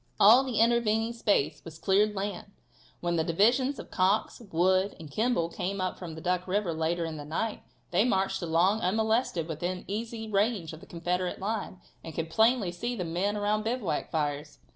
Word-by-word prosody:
All 230 +6 +8
the 250 -5 -2
intervening 230 -1 +2
space 165 -10 0
was 160 -1 -10
cleared 205 +4 +2
land. 200 -1 -4 0.5
When 175 -1 0
the 160 - +2
divisions 240 - +2
of - - -9
Cox, 195 +6 +1
Wood 185 +4 +2
and 155 -3 -10
Kimball 215 - +1
came 190 +3 -3
up 185 -1 -2
from 170 -3 -7
Duck 180 +2 -1
river 190 -2 0
later 165 +2 -1
in 160 -1 -5
the 145 - -6
night, 170 +9 -3 0.3
they 180 +4 +4
marched 195 -4 +1
along 175 +6 +2
unmolested 220 -3 +1
within 175 +3 -3
that - - -19
easy 220 +2 -4
range 200 -5 0
of 160 - -9
the - - -15
Confederate 180 +1 -2
line, 200 -2 -4 0.2
and 160 -2 -8
could 165 0 -3
plainly 220 -2 +3
see 235 +8 -3
the 185 -6 -3
men 185 +5 -1
around 210 +1 +1
the 215 - -7
bivouac 195 -12 -3
fires. 145 -1 -2
190 Hz, 185 wpm, -29 LUFS, 170-220 Hz, 0.5 s, All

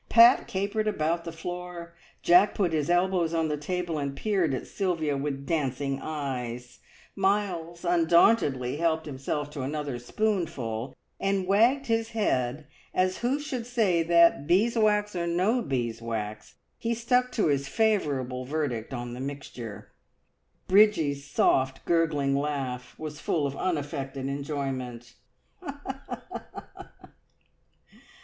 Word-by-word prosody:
Pat 235 +1 +7
capered 205 +3 -1
about 170 -3 0
the 165 - -4
floor, 175 0 -7 0.3
Jack 180 +4 +5
put 180 -5 +1
his 150 -1 0
elbows 175 -2 +2
on 160 -1 +1
the 150 - 0
table 170 +1 -3
and 140 -1 -3
peered 195 -8 +1
at 130 - -3
Sylvia 165 -7 -1
with 140 0 -3
dancing 135 -3 -1
eyes, 125 -5 -5 0.4
Miles 190 -4 -1
undauntedly 165 - +3
helped 160 -1 +1
himself 145 +1 -3
to 145 - -5
another 140 -2 -3
spoonful, 130 - -2 0.2
and 195 -1 0
wagged 235 +9 +3
his 225 -1 0
head 135 - 0 0.3
as 185 0 +1
who 255 +4 0
should 255 -5 -4
say 215 -9 +2
that, 170 -3 +4
beeswax 210 +1 +3
or 170 -1 -1
no 190 +9 +2
beeswax, 115 - -3 0.2
he 230 0 -1
stuck 250 +2 +1
to 220 - +1
his 140 -2 +1
favourable 140 - 0
verdict 130 -4 -3
on 120 0 -5
the 125 - -7
"mixture." 120 -7 -7 0.8
Bridgie's 165 -9 +4
soft, 130 -1 +2
gurgling 150 -5 +2
laugh 140 -3 -3
was 150 -1 -6
full 150 -2 0
of 140 -1 -3
unaffected 140 -5 -3
enjoyment. 135 -4 -4
160 Hz, 120 wpm, -27 LUFS, 135-190 Hz, 0.8 s, Pat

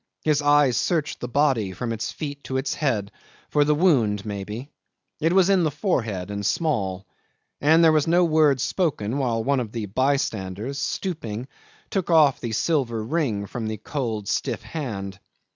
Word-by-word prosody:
His 150 -2 +2
eyes 145 -3 +4
searched 160 -4 0
the 125 - -4
body 125 -7 +1
from 115 +5 -3
its 110 -1 -3
feet 145 -2 -6
to 130 - -2
its 130 - -1
head, 110 -9 -1 0.4
for 150 - +4
the 150 +1 +2
wound 120 - +2
maybe. 105 +6 -6 0.5
It 165 +2 +2
was 190 0 +5
in 190 -3 +4
the 155 - +2
forehead 115 - -2
and 100 0 -4
small; 95 - -1 0.6
and 160 +3 +5
there 160 - +7
was 155 -1 +2
no 175 +2 +4
word 155 -4 +3
spoken 140 - -1
while 115 -4 0
one 140 +1 +1
of 115 -4 -4
the 115 -3 -3
by 130 +8 +2
standers, 110 +3 -3
stooping, 130 - -3 0.4
took 190 -3 -1
off 155 -5 +5
the 120 - -3
silver 120 -3 0
ring 115 -6 -1
from 110 +2 -5
the 110 0 -3
cold 110 -5 -4
stiff - - -2
hand. 100 - -5
130 Hz, 175 wpm, -24 LUFS, 110-150 Hz, 0.6 s, there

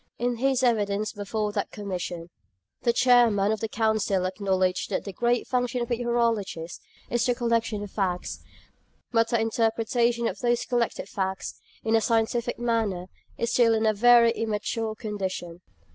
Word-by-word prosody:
In 240 0 -1
his 265 +1 +1
evidence 210 -3 +1
before 210 0 -2
that 205 -1 -2
Commission, 180 -4 -5 0.5
the 240 - +3
Chairman 235 -5 +4
of 220 - -1
the 225 - -2
Council 215 -4 +1
acknowledged 185 -1 0
that - - -1
the 200 - -7
great 240 +3 +1
function 250 -1 -1
of 240 0 -3
meteorologists 230 -8 -1 0.3
is 240 0 +1
the 245 0 +2
collection 230 -3 0
of 205 - -8
facts; 185 -3 -2 0.7
but 230 -1 +3
the 235 - +2
interpretation 230 +1 +1
of - - -4
those 240 -1 +1
collected 240 -2 -1
facts, 190 -5 -4 0.2
in 225 0 +2
a 225 - +4
scientific 230 +1 0
manner, 220 -6 -1 0.3
is 235 - -1
still 230 -2 +4
in 220 0 +1
a 215 - +4
very 235 +2 +6
immature 220 0 -2
condition. 190 -5 -5
225 Hz, 155 wpm, -26 LUFS, 200-235 Hz, 0.7 s, very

